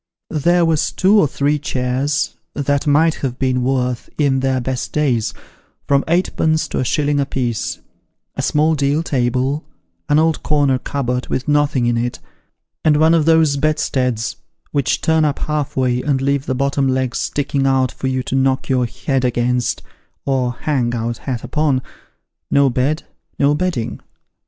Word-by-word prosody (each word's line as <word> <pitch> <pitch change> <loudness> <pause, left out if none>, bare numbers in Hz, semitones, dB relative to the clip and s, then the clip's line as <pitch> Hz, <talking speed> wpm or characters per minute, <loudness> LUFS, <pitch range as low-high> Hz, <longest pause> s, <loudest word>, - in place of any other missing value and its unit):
There 170 +3 +3
was 160 -2 +1
two 200 +3 +4
or 155 - +4
three 145 +2 0
chairs, 135 +2 -1 0.2
that 145 0 0
might 155 +3 +4
have 125 -3 -2
been 130 -1 0
worth, 125 -2 -1
in 140 -3 +2
their 130 -1 +1
best 125 0 -3
days, 130 -7 +1 0.6
from 140 0 +3
eightpence 160 -2 +1
to - - -2
a - - +1
shilling 145 +3 +1
a 140 - +1
piece; 120 -4 -2 0.6
a - - -2
small 155 +2 +2
deal 145 +1 +1
table, 130 +1 0 0.5
an 145 - +4
old 160 0 +2
corner 145 -3 +2
cupboard 125 -3 -2
with 130 - -3
nothing 145 -4 +2
in 120 0 +1
it, 120 +1 -2 0.7
and 155 -2 +4
one 160 +2 +4
of 160 -3 +3
those 160 -3 +4
bed 155 +2 +1
steads 125 -5 -1 0.3
which 140 -3 0
turn 160 -1 +2
up 145 -2 +1
half 150 -3 -3
way, 125 -1 +1
and 140 -2 0
leave 140 +1 0
the 130 - 0
bottom 140 +1 +1
legs 130 -1 0
sticking 140 -1 -1
out 130 -1 +2
for 135 - -4
you 130 -1 -1
to - - -5
knock 135 0 +1
your 125 -2 +2
head 135 +2 -2
against, 125 0 0 0.4
or 130 -3 0
hang 130 -6 0
your 115 0 -1
hat 120 0 -5
upon; 150 -4 +1 0.7
no 140 -2 +4
bed, 140 +6 0 0.3
no 140 +1 +3
bedding. 155 -8 -2
140 Hz, 165 wpm, -18 LUFS, 125-150 Hz, 0.7 s, two